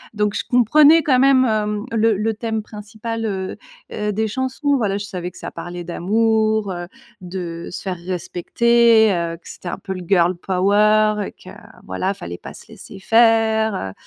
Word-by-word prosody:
Donc 210 -1 0
je - - -2
comprenais 295 +7 +5
quand 265 -3 +3
même, 265 -1 +5
heu, 210 -2 -1
le 225 -2 +2
le 220 +2 -1
thème 220 0 -3
principal, 220 +2 -6
heu 190 -3 -4 0.3
heu, 210 0 -2
des 220 +2 -1
chansons. 260 +5 -1
Voilà, 200 -5 -1
je 205 - -5
savais 180 -3 -5
que - - -17
ça - - -7
parlait 175 +1 -7
d'amour, 220 +3 0
heu, 175 -1 -6 0.3
de 175 -2 -6
se - - -7
faire 185 -2 -3
respecter, 220 +5 +3
heu, 170 -1 -2
que 170 - -19
c'était - - -10
un - - -3
peu 190 - -6
le 185 - -7
Girl 180 -1 +3
power 210 +4 +2
et - - -9
que, - - -14 0.3
voilà, 95 - -2
il 200 - -2
fallait 85 - -8
pas - - -10
se - - -14
laisser - - -12
faire, 225 0 +3
heu 95 - -5
210 Hz, 190 wpm, -20 LUFS, 185-225 Hz, 0.3 s, comprenais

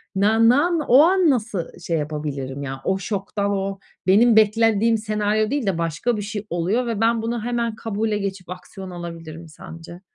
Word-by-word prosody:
nan 220 +4 +4
nan 330 +7 +3
o 255 +3 +7
an 365 0 +4
nasıl 220 - -2
şey 165 -1 -2
yapabilirim 145 -3 -4
ya? 135 -1 -6
O 190 - 0
şoktan, 200 +1 -2
o 195 0 -2 0.3
benim 220 +4 +5
beklendiğim 225 +1 +3
senaryo 215 0 0
değil 285 -4 -1
de 195 -4 0
başka 170 +8 -1
bir 205 - -3
şey 205 0 -6
oluyor 185 +9 0
ve 225 -2 -2
ben 230 0 +2
bunu 230 0 -3
hemen 235 -1 -2
kabule 215 0 -2
geçip 195 -3 -5
aksiyon 185 +1 -9
alabilirim 165 -2 -8
sence? 165 +2 -11
205 Hz, 170 wpm, -22 LUFS, 175-225 Hz, 0.3 s, o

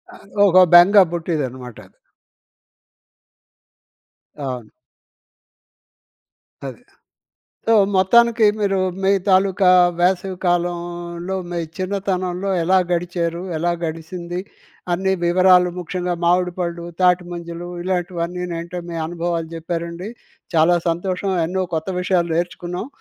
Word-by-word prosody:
అది 200 - -17 0.2
ఒక 185 0 +3 0.2
బెంగ 180 +4 +8
బుట్టేదనమాట. 130 -8 -4 2.6
అవును. 125 -6 -6 2.0
అది. 135 - -8 0.9
సో, 225 - +4 0.2
మొత్తానికి 230 +4 +4
మీరు, 195 -1 +1 0.2
మీ 190 - +3 0.2
తాలూకా 190 0 +4 0.3
వేసవి 185 +1 +1
కాలంలో, 175 +1 -2
మీ 175 - -3 0.2
చిన్నతనంలో, 185 -1 -2
ఎలా 185 +3 +3
గడిచారు, 170 0 -2
ఎలా 175 +2 0
గడిసింది? 170 +2 -5 0.5
అన్ని 190 +2 0
వివరాలు, 180 +1 +5
ముఖ్యంగా 180 0 -3
మామిడి 180 +1 +2
పళ్ళు, 170 -1 -3 0.2
తాటిమంజలు 175 -1 0 0.2
ఇలాంటివన్నీనేంటే, 175 -1 -3
మీ 170 - -5
అనుభవాలు 170 -1 -3
చెప్పారండి. 170 +4 -5 0.5
చాలా 165 +3 +5
సంతోషం. 185 +3 -2
ఎన్నో 185 +2 -1
కొత్త 160 +3 -4
విషయాలు 180 -2 0
నేర్చుకున్నాం. 175 +3 -3
175 Hz, 90 wpm, -20 LUFS, 170-185 Hz, 2.6 s, బెంగ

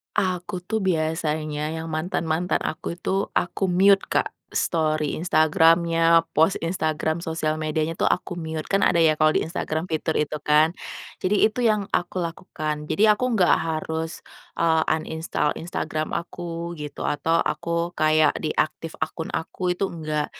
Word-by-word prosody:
Aku 185 0 -1
tuh 220 0 0
biasanya 155 -3 -1
yang 160 0 -5
mantan-mantan 165 +1 -1
aku 160 +2 -5
itu 175 - -6 0.3
aku 175 +2 -4
mute 195 +2 +5
Kak, - - +1 0.2
story 155 -3 0
Instagram-nya, 165 0 +4
post 160 +6 +4
Instagram 160 -2 -1
sosial 160 -2 -2
medianya 155 +1 -1
tuh - - +3
aku - - -8
mute. 160 -1 -4
Kan 195 0 +3
ada 170 - +2
ya 155 -1 +5
kalau 155 0 +5
di - - +3
Instagram 160 -1 -3
fitur 160 0 -1
itu 150 0 -1
kan, 150 +1 +5 0.5
jadi 195 +3 +1 0.2
itu 250 - -6
yang 210 -1 +2
aku 175 +1 -1
lakukan. 155 -2 -4
Jadi 205 - +1
aku 210 +4 0
nggak 180 -4 +4
harus, 160 0 -2 0.5
eee, 160 -1 +3
uninstall 160 -1 -2
Instagram 155 -2 -3
aku 170 +1 -10 0.4
gitu, 150 - -7
atau 160 +3 +1 0.2
aku - - -7 0.3
kayak 155 0 +4
deactive 155 +1 -1
akun 160 - -5
aku, 160 - -8
itu 190 - -2
enggak 155 -2 -2
160 Hz, 145 wpm, -24 LUFS, 155-175 Hz, 0.5 s, mute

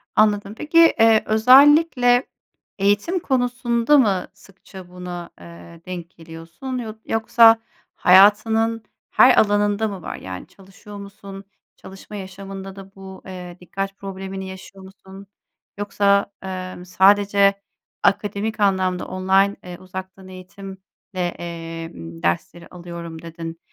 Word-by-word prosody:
Anladım. 205 -1 +2
Peki, 305 +2 -2 0.2
eee, 225 -1 +5
özellikle 255 +2 +5 0.5
eğitim 205 - +1
konusunda 245 -1 +1
mı 200 -9 +1
sıkça 190 -1 -15
buna, 180 -1 -8
eee, 170 0 -14
denk 175 -2 -7
geliyorsun, 165 +10 -9
yod 225 -3 -6
yoksa 225 0 +4 0.4
hayatının 220 +4 +4 0.3
her - - +5
alanında 205 +1 +2
mı 195 -4 -7
var? - - -6
Yani 95 -1 -9
çalışıyor 195 +2 -14
musun? 200 -1 -11 0.3
Çalışma 195 +2 -12
yaşamında 195 0 -8
da 195 0 -13
bu, 190 0 -11
eee, 180 -1 -9
dikkat 195 +2 -6
problemini 190 0 -7
yaşıyor 190 +1 -12
musun? 190 +1 -14 0.5
Yoksa, 200 0 +1
emm, 185 -1 -7
sadece 200 +1 +3 0.4
akademik 205 +2 0
anlamda 190 -2 0
"Online, 190 +2 +1
ııı, 180 -1 -8
uzaktan 190 0 -9
eğitimle, 190 +1 -11 0.4
eee, 165 -2 -5
dersleri 85 - -4
alıyorum." 170 -2 -9
dedin. 165 0 -8
195 Hz, 110 wpm, -21 LUFS, 180-210 Hz, 0.5 s, eee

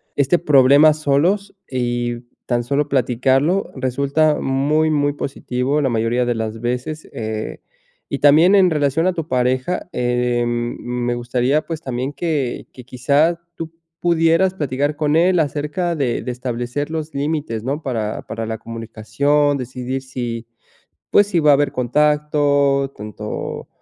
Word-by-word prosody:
este 140 +4 +3
problema 145 0 +6
solos 155 +8 0
y 120 -2 -2 0.3
tan 120 -1 0
solo 140 +4 0
platicarlo 135 +6 +1
resulta 140 +4 +1
muy, 150 +4 +1
muy 145 -1 +1
positivo 135 0 -2
la 135 - +1
mayoría 115 +1 +1
de 120 -1 0
las 110 0 -4
veces, 125 +6 -3
eh 110 -1 -4 0.5
y 140 - -3
también 155 +6 +6
en 190 -2 +6
relación 150 +1 +1
a 185 - +2
tu 165 -3 -4
pareja, 130 +7 0
eh, 120 -1 0
me 120 +1 -2
gustaría, 125 +4 0
pues, 165 -2 -5
también 130 0 -3
que 150 -6 -2
que 125 - -12
quizá 145 +7 +1
tú 165 -1 -6 0.3
pudieras 170 +2 +3
platicar 145 -3 -1
con 150 0 0
él 175 +2 +4
acerca 155 +4 -1
de 135 -6 -1
de 125 - -4
establecer 125 +4 -4
los 160 -1 -4
límites, 145 -6 -2
¿no? 140 +5 -2
Para 115 -7 -3
para 115 0 -4
la 110 0 -4
comunicación, 115 +6 0
decidir 130 +1 -4
si, 120 -3 -5 0.7
pues, 205 - +5
si 180 -4 +1
va 150 -1 +4
a - - +7
haber 145 +1 +2
contacto 145 +1 +2
tanto 105 0 -6
140 Hz, 145 wpm, -20 LUFS, 120-155 Hz, 0.7 s, a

